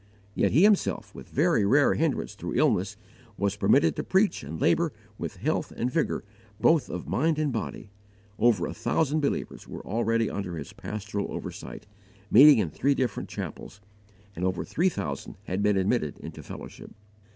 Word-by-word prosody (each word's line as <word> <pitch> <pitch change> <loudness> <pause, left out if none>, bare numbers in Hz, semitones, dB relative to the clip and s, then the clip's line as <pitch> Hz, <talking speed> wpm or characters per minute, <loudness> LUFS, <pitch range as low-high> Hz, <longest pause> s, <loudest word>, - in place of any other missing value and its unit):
Yet - - +1
he 155 - +5
himself, 210 -1 +2
with - - -11
very - - +2
rare 140 +8 +4
hindrance 160 -4 -1
through - - -5
illness, 100 +3 +2 0.4
was 100 0 0
permitted 95 -6 +3
to - - -3
preach 195 +2 +2
and 80 +3 -6
labour 170 -2 +2 0.3
with - - -4
health 150 - -1
and 125 +2 -1
vigour 165 +3 0 0.4
both 160 +5 +3
of - - -5
mind 160 +3 +1
and 150 -4 0
body; 110 -2 -5 0.5
over 120 -2 +3
a - - -4
thousand 150 +6 0
believers 145 - -3
were - - -8
already 115 +1 +1
under 90 -5 -4
his 70 -3 -7
pastoral 105 -1 -5
oversight, - - -7 0.5
meeting 140 +4 +9
in 90 -8 0
three 140 - +1
different 125 -6 -2
chapels, 100 - -7 0.6
and 85 - -5
over 95 -1 -1
three 180 +4 +1
thousand 70 - -5
had 95 +2 -2
been 105 -1 +3
admitted 95 - 0
into - - -9
fellowship. - - -10
115 Hz, 165 wpm, -27 LUFS, 100-150 Hz, 0.6 s, meeting